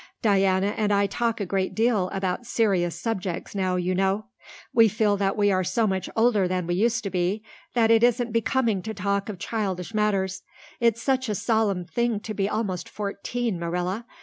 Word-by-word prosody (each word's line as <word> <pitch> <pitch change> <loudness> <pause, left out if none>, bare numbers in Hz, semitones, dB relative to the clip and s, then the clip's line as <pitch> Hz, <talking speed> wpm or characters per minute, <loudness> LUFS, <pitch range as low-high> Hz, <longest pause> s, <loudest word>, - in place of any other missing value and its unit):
Diana 195 -1 +3
and 210 -1 +1
I 200 0 +3
talk 230 +3 -1
a 200 - -1
great 190 0 -1
deal 220 -5 +2
about 195 +4 -2
serious 185 -8 +1
subjects 190 -5 -3
now, 185 -2 0
you 180 0 0
know. 195 +3 +1 0.5
We 230 -1 +6
feel 210 0 +2
that 195 0 0
we 205 -1 +3
are 185 -1 +2
so 225 +5 +1
much 190 -2 -1
older 225 -4 +3
than 180 -1 -1
we 175 - -1
used 230 +5 +1
to 200 - -3
be 185 +4 -1 0.3
that 230 -2 +4
it 225 -1 +5
isn't 240 0 +2
becoming 230 -3 +1
to 220 +3 -6
talk 200 +1 -1
of 205 - -5
childish 195 -1 -3
matters. 195 -3 0 0.4
It's 230 -1 +2
such 260 -3 +1
a 210 - 0
solemn 205 -4 +1
thing 235 +2 0
to 215 - -5
be 200 -1 0
almost 205 -5 -2
fourteen, 210 0 -3
Marilla. 180 +6 -2
205 Hz, 190 wpm, -25 LUFS, 185-225 Hz, 0.5 s, We